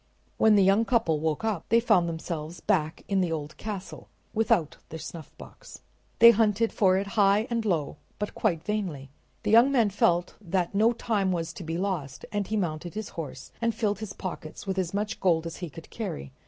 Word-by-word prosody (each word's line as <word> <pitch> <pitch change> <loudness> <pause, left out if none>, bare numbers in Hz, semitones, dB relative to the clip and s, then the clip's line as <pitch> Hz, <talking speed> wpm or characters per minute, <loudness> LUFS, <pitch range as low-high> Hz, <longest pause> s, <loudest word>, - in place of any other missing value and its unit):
When 220 -1 +5
the 200 - +5
young 195 +4 +4
couple 225 -10 +1
woke 155 +4 -1
up 215 -7 -2
they 230 - +5
found 180 -7 +3
themselves 165 0 -5
back 160 -6 0
in 195 -1 +1
the 175 -2 0
old 155 -1 -4
castle, 205 -3 -7 0.2
without 220 - +1
their 160 - -6
snuffbox. 160 0 -11 0.3
They 235 0 +10
hunted 225 0 +2
for 185 -2 +3
it 195 - -1
high 200 +1 +3
and 230 -1 0
low, 170 -9 -1 0.2
but 210 - -4
quite 170 -8 0
vainly. 180 -11 -3 0.3
The - - 0
young 235 +5 +7
man 230 -6 +3
felt 175 -3 +2
that 180 -2 -1
no 220 +4 +4
time 210 -5 0
was 170 -1 -2
to 180 - -8
be 165 +1 -3
lost, 175 -9 -3
and 205 -2 -1
he 215 - -1
mounted 175 -1 -3
his 215 0 -4
horse 145 -5 -7
and 230 -1 +1
filled 205 -3 0
his 215 -3 -6
pockets 175 -4 -7
with 190 -1 -1
as 180 -2 -1
much 205 +1 -2
gold 170 -3 +2
as 165 - -6
he 175 -2 -5
could 160 +3 -12
carry. 70 - -5
190 Hz, 200 wpm, -27 LUFS, 165-215 Hz, 0.3 s, They